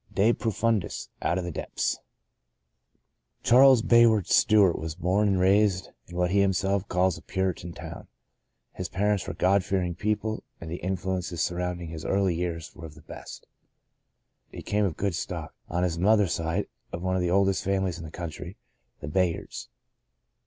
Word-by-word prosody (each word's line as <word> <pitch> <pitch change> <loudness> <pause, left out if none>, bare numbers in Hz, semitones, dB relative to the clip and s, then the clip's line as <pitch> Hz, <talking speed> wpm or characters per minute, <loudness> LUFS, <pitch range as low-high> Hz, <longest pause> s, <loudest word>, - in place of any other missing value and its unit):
De 110 +4 +4
profimdis 110 -3 -1
— - - -40
out 85 - 0
of 95 - -2
the 90 - -4
depths! - - -2 1.4
Charles 130 -1 +6
Bayard 115 -5 +5
Stewart 100 -5 +4
was 80 0 -5
born 95 +4 +1
and 95 -2 +2
raised 95 0 +3 0.2
in 90 - -11
what 90 0 +1
he 100 - +3
himself 95 +1 +1
calls 90 0 +1
a - - -18
Puritan 95 -3 -2
town. - - -9 0.7
His 90 - -5
parents 105 0 0
were 95 - -4
God 95 +2 +3
fearing 90 -2 -1
people, 105 +3 -2 0.2
and 80 -1 -8
the 85 - -3
influences 90 -2 -2
surrounding 90 -1 -3
his 80 -1 -7
early 95 -2 +1
years 85 -1 -4
were 85 - -8
of 75 - -15
the 75 - -16
best. - - -10 1.0
He - - -9
came 105 0 +1
of 90 -6 -2
good 100 -2 -1
stock, - - -5 0.2
on 90 +2 0
his 85 -2 -1
mother's 105 -1 +3
side 85 +5 -1 0.3
of 85 - -5
one 95 0 0
of 95 - +1
the 90 - 0
oldest 95 +1 +2
families 95 -2 -1
in - - -8
the 80 - -7
country 85 +2 -7 0.2
— - - -47
the - - -6
Bayards. 85 +2 -1
95 Hz, 175 wpm, -27 LUFS, 85-100 Hz, 1.4 s, Charles